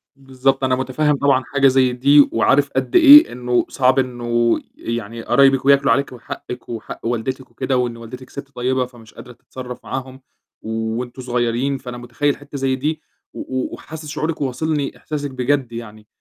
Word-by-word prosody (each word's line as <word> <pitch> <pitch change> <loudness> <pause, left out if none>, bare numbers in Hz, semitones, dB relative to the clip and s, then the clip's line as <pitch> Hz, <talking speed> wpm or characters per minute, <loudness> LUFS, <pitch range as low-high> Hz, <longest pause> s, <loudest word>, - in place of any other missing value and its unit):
بالضبط، 135 0 -1
أنا 130 -1 +2
متفهّم 135 +3 0
طبعًا 135 -2 +2
حاجة 135 0 +4
زي 130 -1 +3
دي، 140 +3 +5
وعارف 140 +5 +2
قد 130 - -1
إيه 300 -2 +9
إنه 125 0 0
صعب 130 0 +2
إنه، 120 -2 0 0.2
يعني 115 0 -5
قرايبِك 135 +3 +3
وياكلوا 140 0 +4
عليكِ، 140 0 +1
وحقِك 125 0 -8
وحق 115 0 -7
والدتِك 125 +3 -3
وكده، 130 -1 -1
وإن 120 -2 -1
والدتِك 125 +3 -10
ست 140 0 -9
طيبة 125 +1 0
فمش 120 -3 -16
قادرة 125 - -12
تتصرّف 125 +1 -9
معاهم، 130 0 -6 0.4
وأنتم 115 +3 -4
صغيّرين، 125 +2 -1
فأنا 125 -2 -8
متخيّل 125 +4 -1
حتّة 145 0 -9
زي 135 -1 0
دي، 155 +4 -3 0.3
و - - -9
و 130 0 -4
وحاسس 155 0 -9
شعورِك 155 +1 -3
وواصلني 140 +2 -2
إحساسِك 145 -2 -5
بجد 130 -1 -1
يعني، 110 -2 -9
130 Hz, 165 wpm, -20 LUFS, 120-140 Hz, 0.4 s, إيه